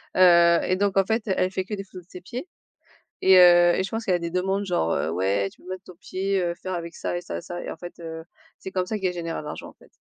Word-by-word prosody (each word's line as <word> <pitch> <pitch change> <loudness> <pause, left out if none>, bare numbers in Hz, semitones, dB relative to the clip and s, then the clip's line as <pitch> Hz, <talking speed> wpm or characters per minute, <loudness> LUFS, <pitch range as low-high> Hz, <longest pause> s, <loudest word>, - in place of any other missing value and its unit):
heu 170 -2 +6
et 185 - +1
donc 200 0 0
en 195 - +4
fait, 225 +3 0
elle 185 -1 +1
fait 190 -1 -2
que 210 - -4
des 195 - -6
photos 185 -2 -13
de - - -41
ses 180 - -9
pieds 245 - -7 0.7
et 190 0 +7
heu 175 -1 +7
et - - +1
je 195 - -4
pense 225 +1 -3
qu'elle 185 -4 +2
a - - -1
des 170 0 -3
demandes 190 +3 -1
genre, 175 - 0
heu: - - -1
«Ouais 95 +3 0
tu - - -23
peux 180 - -13
mettre 185 0 -6
ton 180 - -12
pied, 190 +2 -2
heu, 175 -1 -1
faire 185 +2 -6
avec 170 -1 -5
ça - - -3
et - - -4
ça 165 - -5
et - - -6
ça» 175 0 -6
et - - -5
en - - -8
fait, 175 +1 -10
heu, 160 -1 -7 0.3
c'est 190 - -7
comme 185 -1 -1
ça 215 +1 -3
qu'elle 185 -2 -1
générait 165 -1 -4
l'argent 150 - -7
en - - -17
fait. - - -22
180 Hz, 300 wpm, -25 LUFS, 170-190 Hz, 0.7 s, et